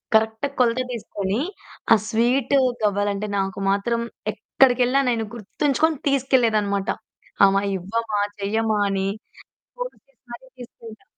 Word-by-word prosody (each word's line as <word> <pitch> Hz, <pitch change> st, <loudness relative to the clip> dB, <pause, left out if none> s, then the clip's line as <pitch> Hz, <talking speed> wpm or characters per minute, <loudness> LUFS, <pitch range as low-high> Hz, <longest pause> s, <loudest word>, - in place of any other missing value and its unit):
కరెక్ట్‌గా 220 Hz, +4 st, +2 dB
కొలత 245 Hz, 0 st, +3 dB
తీసుకొని, 205 Hz, -3 st, -3 dB, 0.5 s
ఆ -, -, +8 dB
స్వీటు 250 Hz, +4 st, +2 dB, 0.2 s
గవ్వలు 205 Hz, 0 st, +1 dB
అంటే 205 Hz, +1 st, -4 dB
నాకు 195 Hz, 0 st, -2 dB
మాత్రం 215 Hz, +4 st, 0 dB, 0.3 s
ఎక్కడికెళ్లినా 255 Hz, +1 st, +3 dB
నేను 225 Hz, -2 st, -1 dB
గుర్తుంచుకొని 290 Hz, +8 st, 0 dB
తీసుకెళ్లలేదన్నమాట. 225 Hz, -7 st, +1 dB, 0.6 s
"అమ్మ, 195 Hz, 0 st, +4 dB, 0.2 s
ఇవ్వమా? 210 Hz, +3 st, -2 dB, 0.2 s
చెయ్యమ్మా?" 215 Hz, +1 st, 0 dB
అని 195 Hz, 0 st, -1 dB, 0.7 s
గోల -, -, -3 dB, 0.2 s
చేసి 275 Hz, -3 st, -35 dB
మరి 255 Hz, +2 st, -11 dB
తీసుకెళ్లే 230 Hz, -2 st, -12 dB
225 Hz, 115 wpm, -23 LUFS, 205-250 Hz, 0.7 s, ఆ